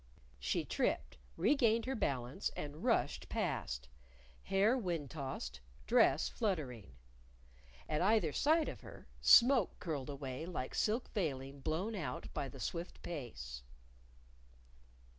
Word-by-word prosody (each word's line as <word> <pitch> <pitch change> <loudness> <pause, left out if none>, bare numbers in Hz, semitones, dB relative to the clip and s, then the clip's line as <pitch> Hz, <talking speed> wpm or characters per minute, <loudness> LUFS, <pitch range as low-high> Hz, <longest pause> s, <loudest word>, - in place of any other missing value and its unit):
She - - 0
tripped, - - -1 0.2
regained 230 - +3
her 265 - -1
balance, 130 - -1
and 150 +1 -6
rushed - - +1
past, 60 0 -2 0.6
hair 200 +5 +4
wind 170 - -2
tossed, 130 - -5 0.2
dress - - +4
fluttering. 135 - -2 0.9
At 150 - 0
either 190 -6 +3
side 315 +2 +3
of - - -6
her, - - -12
smoke 245 -4 +6
curled 150 -5 -4
away 140 +2 -5
like 150 -8 -4
silk 225 +4 0
veiling 140 -7 -2
blown 165 +10 -1
out 150 -11 -4
by 140 - -2
the 135 - -11
swift 170 +6 -4
pace. 65 - -6
155 Hz, 120 wpm, -36 LUFS, 130-210 Hz, 0.9 s, smoke